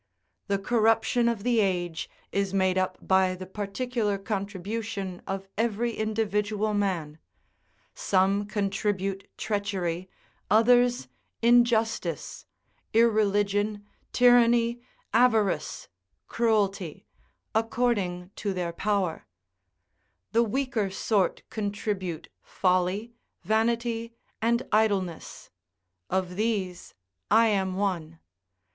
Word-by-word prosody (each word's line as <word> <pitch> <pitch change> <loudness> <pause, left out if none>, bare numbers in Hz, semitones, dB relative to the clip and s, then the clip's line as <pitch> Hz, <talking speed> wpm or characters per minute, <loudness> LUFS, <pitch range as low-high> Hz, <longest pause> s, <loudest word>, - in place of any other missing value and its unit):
The 200 - +1
corruption 225 +2 +2
of 225 -4 -3
the 240 -1 +2
age 175 -5 -1 0.2
is 195 -1 -1
made 190 -1 +2
up 185 0 0
by 190 -1 +3
the 185 +1 -8
particular 210 +2 -2
contribution 200 -1 -4
of 195 0 -4
every 230 +1 0
individual 215 -1 -1
man; 175 -7 -1 0.7
some 195 +1 +1
contribute 195 -1 -2
treachery, 190 -4 -2 0.4
others 245 +3 +4 0.4
injustice, 235 -1 +2 0.5
irreligion, 205 -2 +2 0.3
tyranny, 240 -1 +4 0.3
avarice, 225 -4 +2 0.4
cruelty, 200 -7 0 0.5
according 215 -6 0
to 200 -2 -2
their 175 -2 -2
power; 195 - -1 1.0
the 230 - +4
weaker 235 -2 0
sort 195 0 0
contribute 200 -5 -3
folly, 185 +5 0 0.3
vanity, 230 +3 0 0.3
and 235 +1 +2
idleness; 200 -6 0 0.6
of 185 -1 -1
these 200 -5 -2 0.3
I 225 +2 +5
am 190 -3 0
one. 175 -5 -2
205 Hz, 90 wpm, -27 LUFS, 190-225 Hz, 1.0 s, I